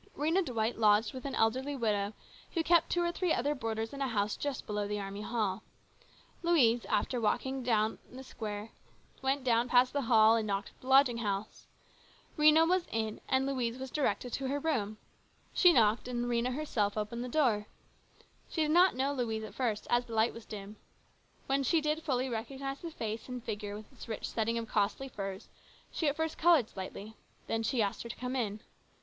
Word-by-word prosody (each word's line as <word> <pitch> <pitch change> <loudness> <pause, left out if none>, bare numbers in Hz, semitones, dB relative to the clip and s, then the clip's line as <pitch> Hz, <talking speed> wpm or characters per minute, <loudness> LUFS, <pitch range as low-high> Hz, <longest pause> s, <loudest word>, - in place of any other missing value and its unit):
Rhena 325 +6 +2
Dwight 230 -5 -2
lodged 210 +1 +4
with 260 0 -8
an 275 - -3
elderly 260 +6 +1
widow 210 -4 0 0.4
who 330 - +2
kept 340 +1 +4
two 350 - +1
or 345 - +1
three 355 -1 -1
other 285 +1 +1
boarders 225 -3 -3
in 280 - -6
a 270 - +1
house 210 -3 0
just 285 -2 -4
below 210 -1 -2
the 210 0 -2
Army 200 +1 -5
Hall. 215 -3 -1 0.8
Louise, 250 -9 +3
after 245 -2 0
walking 265 +4 0
round 220 -2 +1
the 260 +2 -9
square, 215 -3 -6 0.5
went 270 +1 0
down 240 -1 +2
past 250 0 +4
the 285 - 0
hall 225 -2 +5
and 220 -2 0
knocked 200 0 -2
at - - -26
this 255 - -9
lodging 265 -3 +6
house. 205 -1 -4 0.7
Rhena 310 +1 +6
was 365 0 +1
in, 220 -1 -2
and 265 0 +2
Louise 250 -3 -1
was 265 0 -6
directed 255 -4 -1
to 270 - -2
her 280 +2 -1
room. 225 -9 -1 0.6
She 360 - +6
knocked, 225 -4 +3
and 240 -1 -2
Rhena 245 +1 0
herself 220 -9 -1
opened 215 +3 -3
the 250 - -5
door. 235 -7 +2 0.8
She 325 - -2
did 305 - 0
not 360 +3 +5
know 270 +2 0
Louise 225 -4 -2
at 215 - -8
first, 225 -5 -1
as 240 0 +3
the 230 - -7
light 220 +1 +3
was 230 - -11
dim. 210 0 -8 0.7
When 275 +1 +1
she 320 +5 +3
did 305 +1 -1
fully 265 -5 0
recognise 270 +4 -4
the 335 - -6
face 225 -6 -5
and 250 -2 -5
figure 205 -2 -4
with 215 - -13
its - - -11
rich 220 - -4
setting 230 +1 -1
of 230 -1 -3
costly 215 +7 0
furs, 195 -4 -6 0.4
she 320 - -1
at 285 - +1
first 320 0 -2
coloured 320 -9 +5
slightly. 195 +3 -7 0.3
Then 225 - -1
she 225 +1 +1
asked 200 - -2
her 235 - -7
to 230 - -5
come 250 +1 -4
in. 215 -4 -2
240 Hz, 200 wpm, -32 LUFS, 215-275 Hz, 0.8 s, lodging